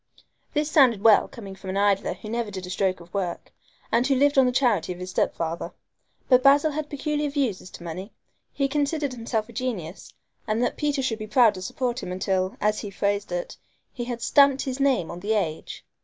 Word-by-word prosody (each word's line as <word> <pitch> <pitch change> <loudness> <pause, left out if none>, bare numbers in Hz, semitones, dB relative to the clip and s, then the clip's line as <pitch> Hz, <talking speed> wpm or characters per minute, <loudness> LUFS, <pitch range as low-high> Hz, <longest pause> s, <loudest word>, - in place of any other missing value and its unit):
This 300 +1 0
sounded 245 -10 +5
well 220 -2 +6
coming 200 -5 -9
from 190 0 -9
an 190 - -2
idler 200 -1 +2
who - - -11
never 230 0 -2
did 190 -2 -6
a 180 - -7
stroke 185 -1 0
of 170 +1 -16
work, 185 -4 -4 0.4
and 245 +2 +3
who 275 - +3
lived 285 +2 +3
on 265 -2 +5
the - - +2
charity 245 -7 +1
of - - -12
his 180 0 -6
step - - 0
father. 165 0 -4 0.5
But 255 -1 +5
Basil 285 +3 +5
had 300 0 -4
peculiar 295 +1 -2
views 270 -9 -1
as 185 - -12
to 170 - -11
money. 180 +5 -6 0.4
He 275 - 0
considered 290 0 -1
himself 230 -2 -2
a 235 - -13
genius, 210 -8 -5 0.4
and 215 +3 +1
that 245 - 0
Peter 290 -2 -1
should 230 -4 -1
be 215 - -6
proud 225 0 +5
to 185 - -8
support 245 +5 -2
him 180 - -6
until, 185 +1 -1
as 210 0 +1
he 205 - -5
phrased 200 +1 -1
it, - - -4 0.4
he 240 - -4
had 240 -1 -5
"stamped 275 +1 +4
his 265 -1 -4
name 265 -11 +1
on 170 - -7
the 205 +4 -1
age"! 165 -7 -3
230 Hz, 220 wpm, -25 LUFS, 190-275 Hz, 0.5 s, well